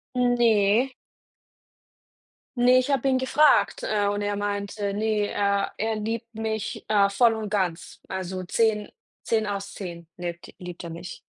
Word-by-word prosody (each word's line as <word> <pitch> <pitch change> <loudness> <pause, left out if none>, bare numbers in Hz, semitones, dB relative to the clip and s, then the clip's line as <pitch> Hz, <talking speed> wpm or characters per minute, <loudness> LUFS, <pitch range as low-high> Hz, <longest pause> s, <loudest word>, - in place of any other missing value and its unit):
Hm, 245 -1 +3
ne. 225 +1 +4 1.7
Ne, 250 +1 +6
ich 255 - -2
habe 275 -2 +1
ihn 260 -1 +3
gefragt, 295 +4 +3
äh, 205 -1 +1
und 205 0 -1
er 205 0 -1
meinte, 200 0 -2
ne, 210 -1 0
er 200 -1 0
er 220 +1 -1
„liebt 225 +2 -4
mich, 220 -1 -3
äh, 205 -2 +4
voll 225 +2 +4
und 215 -2 -4
ganz, 185 -5 -2
also, 185 0 -4
10, 210 +2 +1 0.3
10 220 -1 +1
aus 200 0 -4
10 170 -4 -7
lebt 175 -1 -6
liebt 180 0 -8
er 170 - -6
mich“. 170 +2 -8
205 Hz, 155 wpm, -25 LUFS, 200-225 Hz, 1.7 s, Ne